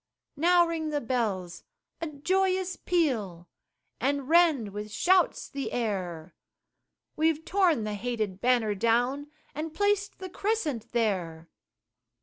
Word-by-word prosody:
Now 345 +3 +4
ring 325 -2 -2
the 295 -1 0
bells 210 -9 -2 0.4
a 330 - -2
joyous 370 +4 0
peal, 220 - -1 0.5
And 275 +1 0
rend 320 -9 +4
with 210 +1 -6
shouts 365 - +2
the 275 -1 -5
air, 185 -8 -3 0.8
We've 320 0 +1
torn 355 - +2
the 210 0 -3
hated 215 -3 -3
banner 240 -4 +2
down, 245 +7 +1 0.2
And 310 +1 -5
placed 405 0 +1
the 375 - -7
Crescent 320 - -2
there. 180 -8 -1
270 Hz, 120 wpm, -28 LUFS, 210-335 Hz, 0.8 s, Now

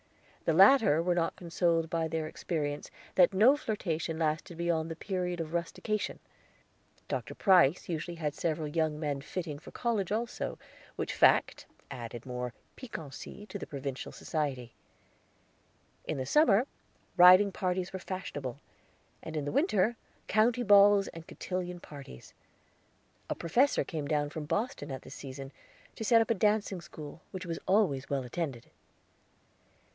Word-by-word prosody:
The - - +3
latter 225 - +7
were 180 0 +2
not 165 -1 0
consoled 170 -1 0
by 165 -1 0
their 160 0 -2
experience 150 -3 -3 0.2
that 185 +1 +5
no 235 +9 +6
flirtation 170 - -2
lasted 160 +2 -1
beyond 165 -2 0
the 165 - -4
period 180 -1 -3
of 160 0 -4
rustication. 190 +5 -2 0.9
Dr. - - -4
Price 180 -5 +4
usually 170 +1 -4
had 150 -3 -2
several 155 -1 -2
young 155 0 0
men 145 -3 -2
fitting 155 -1 -5
for - - -12
college 220 -6 -1
also, 230 +3 -2 0.4
which - - -3
fact - - +3 0.2
added 120 -2 -7
more 125 -1 -4 0.2
piquancy 200 - -8
to 205 - -7
the - - -7
provincial 135 -2 -5
society. 135 -7 -3 1.3
In 155 - -2
the 130 - -2
summer 240 - +4 0.5
riding 185 +2 +8
parties 185 0 -2
were 190 - -4
fashionable, 145 -9 -5 0.6
and 160 0 -6
in 145 - -2
the 145 - -2
winter 240 - +2 0.3
county 235 +3 +3
balls 205 -2 +6
and 165 0 -11
cotillion 180 -1 -4
parties; 140 - -11 1.0
a - - -1
professor 240 - +2
came 155 -4 -4
down 145 -1 0
from 155 -1 -5
Boston 180 - -2
at 130 - -6
this - - -10
season 135 0 -8 0.4
to - - -5
set 230 +1 +5
up 225 - 0
a - - +6
dancing 210 -2 +1
school, 155 0 -10
which 185 -1 -6
was 165 -1 -4
always 185 -9 +2
well 140 -2 -1
attended. 125 -2 -5
170 Hz, 145 wpm, -31 LUFS, 150-195 Hz, 1.3 s, riding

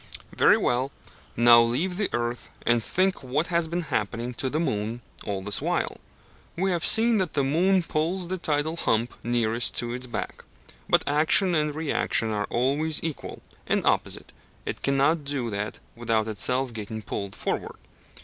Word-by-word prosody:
Very - - +5
well, 130 +3 0 0.5
now 120 0 +8
leave 135 +11 0
the 205 - 0
earth, 120 0 -3 0.2
and 120 -1 +2
think 185 - +1
what 135 +5 -1
has 170 -1 +2
been 170 +2 -2
happening 115 +3 -2
to 130 +2 -2
the 155 - -1
moon 115 -5 -2 0.2
all 95 -2 -3
this 105 +1 +1
while. - - -1 0.6
We 190 +2 0
have 170 -1 -1
seen 225 -1 +6
that 185 -4 -1
the 140 - +1
moon 180 +7 +2
pulls 170 +3 -1
the 185 +1 -3
tidal 155 +1 -1
hump 115 -5 0
nearest 115 -1 +1
to 120 0 -2
it 125 0 -3
back; - - -5 0.5
but - - +4
action 155 +6 +4
and 150 -2 0
reaction 145 -7 0
are 105 -1 -1
always 145 +6 +1
equal 160 -3 -5 0.2
and - - 0
opposite - - -1 0.3
it - - -5
cannot 140 +3 +2
do 140 -5 -2
that 105 +1 -3 0.2
without 115 -2 0
itself 125 +4 +1
getting 110 0 -6
pulled 100 0 -5
forward. - - -3
135 Hz, 165 wpm, -26 LUFS, 115-160 Hz, 0.6 s, now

